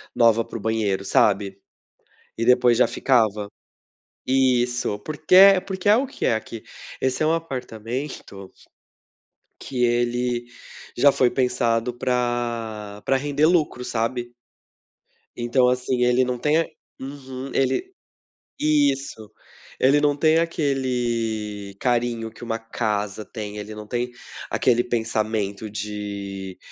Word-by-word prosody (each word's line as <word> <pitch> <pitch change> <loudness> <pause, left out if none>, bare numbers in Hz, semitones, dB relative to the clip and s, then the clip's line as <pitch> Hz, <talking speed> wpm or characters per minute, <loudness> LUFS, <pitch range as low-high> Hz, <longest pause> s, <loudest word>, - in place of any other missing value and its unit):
nova 115 -1 +4
pro 115 - -7
banheiro, 105 -3 -1
sabe? 100 -1 +2 0.8
E 115 - 0
depois 125 -1 +4
já - - +5
ficava. 110 -5 +1 0.8
Isso. 125 -4 +1
Porque 155 - -1
é 195 0 +9
porque 190 0 -3
é 210 - +7
o 265 +2 +1
que 275 - -4
é 115 - +3
aqui 110 0 -6 0.4
esse 130 +3 0
é - - +2
um 160 - +3
apartamento 125 -8 -5 1.1
que 125 -2 -2
ele 120 0 0 0.5
já 140 +3 +6
foi 125 -2 +3
pensado 120 -2 0
pra 120 -4 -2
pra 135 - +2
render 145 +2 +1
lucro, 155 -7 +2
sabe? 120 +1 -2 1.0
Então, 120 +1 +2
assim, 125 0 0
ele 125 +1 +3
não 125 -1 -2
tem 150 +4 +2
a 165 - 0 0.3
uhum, 135 -1 -7
ele 135 - 0 0.7
isso. 140 -7 0 0.5
Ele 140 +3 +4
não 145 -1 +3
tem 160 +2 +4
aquele 120 -10 -2
carinho 120 -2 0
que 120 - -13
uma 115 -1 -2
casa 105 -2 -3
tem. 105 -2 -7
Ele 105 +1 -7
não 105 0 -8
tem 120 +2 -3 0.4
aquele 120 -1 +2
pensamento 110 -3 -2
de: 100 -2 -6
120 Hz, 125 wpm, -23 LUFS, 110-135 Hz, 1.1 s, é